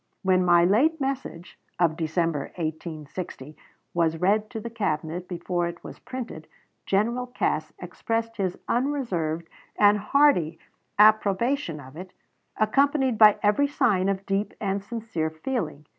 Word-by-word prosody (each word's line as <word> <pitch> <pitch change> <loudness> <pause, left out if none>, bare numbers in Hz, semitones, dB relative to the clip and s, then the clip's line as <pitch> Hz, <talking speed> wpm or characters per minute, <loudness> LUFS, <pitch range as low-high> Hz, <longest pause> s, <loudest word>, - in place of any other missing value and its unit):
When 185 -1 +3
my 175 -1 +5
late 280 - +3
message 265 -11 -4 0.2
(of 170 -3 +2
December, 160 -2 -1
1860) 155 -2 -6 0.4
was 165 -1 +1
read 210 +5 +1
to 225 - -5
the 230 +2 -7
Cabinet 175 -5 -2
before 175 0 -2
it 170 0 -8
was - - -10
printed, 235 -11 -7 0.4
General 235 +6 +1
Cass 155 -10 -1
expressed 225 +6 -3
his 185 -3 -1
unreserved 195 - -1 0.3
and 210 0 +5
hearty 205 - +3 0.4
approbation 215 - +3
of 130 0 -13
it, 180 +2 -9 0.4
accompanied 265 +2 +2
by 215 -2 +8
every 210 +8 +3
sign 195 -9 +1
of 195 0 -2
deep 195 +2 -1
and 195 -1 -2
sincere 210 -7 -3
feeling. 160 - -4
195 Hz, 130 wpm, -25 LUFS, 165-230 Hz, 0.4 s, by